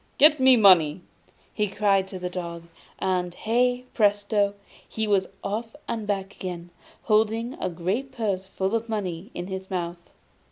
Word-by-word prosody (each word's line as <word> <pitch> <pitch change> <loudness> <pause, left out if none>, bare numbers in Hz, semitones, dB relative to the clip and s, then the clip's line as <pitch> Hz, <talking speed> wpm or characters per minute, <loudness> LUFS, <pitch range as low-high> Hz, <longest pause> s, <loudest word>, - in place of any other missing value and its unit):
Get 300 0 +7
me 260 -1 +7
money!' 180 -6 +6 0.5
he 210 - 0
cried 195 -1 +2
to 190 - -7
the 180 0 -4
dog, 170 -2 -5 0.3
and 180 -2 -1
hey, 245 +2 +1
presto! 205 -1 +2 0.3
he 220 - -2
was 195 -2 +2 0.2
off 225 +5 -4
and 225 -3 -3
back 195 -1 -2
again, 175 -2 -6 0.3
holding 225 +2 +1
a - - 0
great 190 +11 -2
purse 200 -7 -2
full 190 +1 -2
of 230 0 -1
money 195 -3 -3
in 175 - -4
his 190 0 -6
mouth. 175 -2 -3
200 Hz, 155 wpm, -25 LUFS, 185-225 Hz, 0.5 s, Get